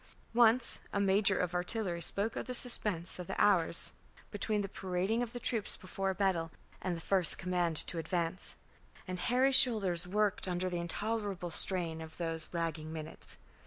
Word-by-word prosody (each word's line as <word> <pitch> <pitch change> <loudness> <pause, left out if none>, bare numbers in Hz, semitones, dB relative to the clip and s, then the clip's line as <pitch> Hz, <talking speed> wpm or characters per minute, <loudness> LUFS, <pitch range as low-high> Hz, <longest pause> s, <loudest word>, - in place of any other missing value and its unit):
Once 235 +1 +4
a 200 - -1
major 195 0 +3
of 180 -1 -1
artillery 180 -1 -1
spoke 200 +6 0
of - - -4
the 250 - 0
suspense 205 -9 +2
of 180 - -6
the - - -4
hours 185 -5 +3 0.4
between 210 -2 -1
the - - -3
parading 190 +4 -2
of 240 -2 -3
the 245 - -6
troops 225 -3 0
before 195 +1 -4
a 190 - -2
battle 185 -5 0 0.3
and 180 -2 -2
the - - -6
first 185 -1 +2
command 175 -3 -1
to 170 - -1
advance; 170 +2 -3 0.5
and 180 0 -4
Harry's 255 +6 +2
shoulders 190 -9 +4
worked 210 +1 0
under 180 0 -2
the 175 - -2
intolerable 200 0 -3
strain 165 -2 +2
of 160 0 -10
those 165 -2 -3
lagging 165 -2 -3
minutes. 160 -1 -9
185 Hz, 170 wpm, -32 LUFS, 170-210 Hz, 0.5 s, Once